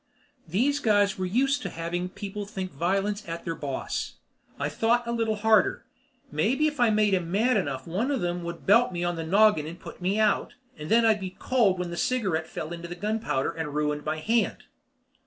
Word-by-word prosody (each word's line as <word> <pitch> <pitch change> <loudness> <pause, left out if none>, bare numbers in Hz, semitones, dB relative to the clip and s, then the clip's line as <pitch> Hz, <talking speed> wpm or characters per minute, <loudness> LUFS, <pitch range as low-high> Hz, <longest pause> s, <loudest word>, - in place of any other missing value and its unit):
These 255 - +1
guys 205 -4 +2
were 185 - -1
used 270 +8 +1
to 195 - -4
having 175 +2 -3
people 205 +1 -6
think 190 -2 -5
violence 195 +7 0
at 165 0 -5
their 165 - -1
boss. 140 -4 -4 0.4
I - - 0
thought 235 +2 +1
a 235 - -2
little 225 -2 0
harder. 220 -1 +3 0.5
Maybe 225 - +1
if 300 -1 -1
I 240 -2 +5
made 210 -2 +3
'em 175 -3 0
mad 225 +6 +3
enough 140 -10 -1
one 190 +10 -1
of 280 -3 0
them 175 -1 -2
would 170 0 -7
belt 230 +4 +5
me 175 -1 -3
on 175 0 0
the 165 - -4
noggin 190 -2 +4
and 170 +2 -8
put - - -11
me 190 +3 0
out, 215 -2 +1 0.2
and 150 0 -8
then 230 +1 +5
I'd 220 -2 +4
be 185 -1 -6
cold 225 -8 +2
when 180 -1 -3
that 170 - -5
cigarette 190 -11 0
fell 155 +1 -5
into 170 0 -7
the 175 - -6
gunpowder 210 -7 -1
and 150 -3 -5
ruined 150 0 0
my 155 +1 -2
hand. 225 +9 0
195 Hz, 210 wpm, -27 LUFS, 170-220 Hz, 0.5 s, I